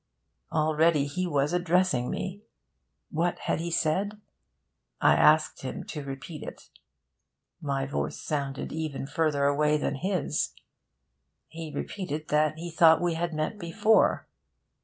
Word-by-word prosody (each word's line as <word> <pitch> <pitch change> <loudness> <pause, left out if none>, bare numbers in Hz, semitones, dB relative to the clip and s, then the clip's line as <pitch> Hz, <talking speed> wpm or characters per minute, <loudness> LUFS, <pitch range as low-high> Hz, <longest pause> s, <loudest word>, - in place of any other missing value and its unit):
Already 155 -1 +3
he 180 +6 -2
was 145 -1 +1
addressing 175 -7 +2
me... 190 +2 -4 0.7
What 170 +3 0
had - - -1
he 170 +1 -3
said? 190 +6 0 0.8
I - - +5
asked 155 0 +4
him 130 - -5
to 150 - -6
repeat 140 +3 -7
it. - - -9 0.9
My 140 -2 -1
voice 140 - -3
sounded 140 -3 -3
even 155 -4 -3
further 150 -1 +1
away 150 +1 +3
than - - -1
his. 180 +2 -1 1.0
He 160 -1 -7
repeated 155 0 -5
that 150 +1 +2
he 170 +1 -6
thought 160 0 +6
we 175 0 0
had 170 +1 -2
met 155 +7 -2
before. 210 +5 +3
155 Hz, 130 wpm, -28 LUFS, 145-175 Hz, 1.0 s, thought